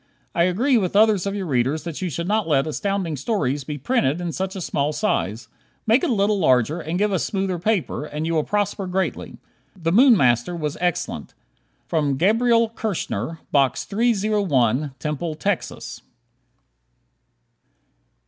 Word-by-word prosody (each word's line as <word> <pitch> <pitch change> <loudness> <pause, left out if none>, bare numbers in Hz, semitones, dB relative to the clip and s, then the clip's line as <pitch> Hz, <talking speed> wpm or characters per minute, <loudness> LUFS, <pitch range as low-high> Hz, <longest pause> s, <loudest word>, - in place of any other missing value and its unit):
I 170 0 +3
agree 235 +8 +2
with 185 -1 -2
others 210 -3 +4
of 200 - -2
your 195 -2 -3
readers 140 +1 0
that 165 0 -6
you 185 - -1
should 170 +3 -4
not 215 -1 +1
let 140 -4 +2
Astounding 185 0 -2
Stories 145 - -1
be 145 +2 -5
printed 150 - 0
in 175 -1 -3
such 190 +3 -3
a 190 - -5
small 145 -3 -1
size. 115 - -1 0.4
Make 230 +4 +3
it - - +1
a - - +2
little 205 0 +2
larger, 130 0 +2
and 165 +1 -3
give 205 +1 +1
us 185 - 0
smoother 190 -3 -2
paper, 180 -6 -1
and 150 +1 -4
you 165 - -1
will 155 -2 +2
prosper 205 0 -1
greatly. 185 +1 -3 0.4
"The 165 -1 0
Moon 240 +4 +6
Master" 120 +3 +2
was 150 -3 -3
excellent. 175 -2 -2 0.8
Gabriel 230 - +3
Kirschner, 165 - -4
Box 135 -2 +2
301, 195 - +1
Temple, 150 +4 -3
Texas. 195 +4 -3
175 Hz, 155 wpm, -22 LUFS, 150-205 Hz, 0.8 s, Moon